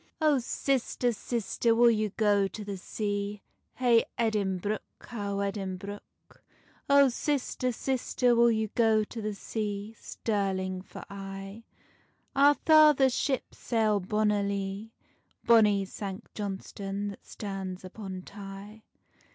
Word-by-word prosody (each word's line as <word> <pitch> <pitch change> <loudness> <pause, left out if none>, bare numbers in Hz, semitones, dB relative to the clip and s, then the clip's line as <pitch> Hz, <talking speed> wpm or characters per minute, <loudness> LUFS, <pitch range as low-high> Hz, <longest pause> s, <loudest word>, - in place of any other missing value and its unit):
"Oh 305 -4 +4
sister, 250 0 0
sister, 230 +1 0
will 235 0 +6
ye 215 -1 0
go 205 -1 +2
to 210 +2 -8
the 200 -1 -4
sea? 205 +1 -3 0.3
Hey 240 -2 +4
Edinbruch, 210 -2 0 0.2
how 200 -4 -4
Edinbruch. 200 0 -6 0.5
Oh 280 -1 +7
sister, 255 -1 -1
sister, 250 0 +1
will 235 0 +6
ye 220 -2 0
go 220 -2 +3
to 225 +2 -7
the 210 -1 -3
sea? 210 0 -4
Stirling 190 -4 -2
for 185 - -10
aye: 195 +2 -8 0.7
Our 285 +1 +6
father's 300 -5 +6
ships 265 0 -2
sail 220 -3 +1
bonnilie, 200 0 -1 0.6
Bonny 210 -4 +5
Sanct 195 +2 -7
Johnstonne 200 0 -4
that 200 - -10
stands 190 -2 -6
upon 190 -1 -7
Tay." 200 +2 -10
210 Hz, 115 wpm, -29 LUFS, 195-235 Hz, 0.7 s, Oh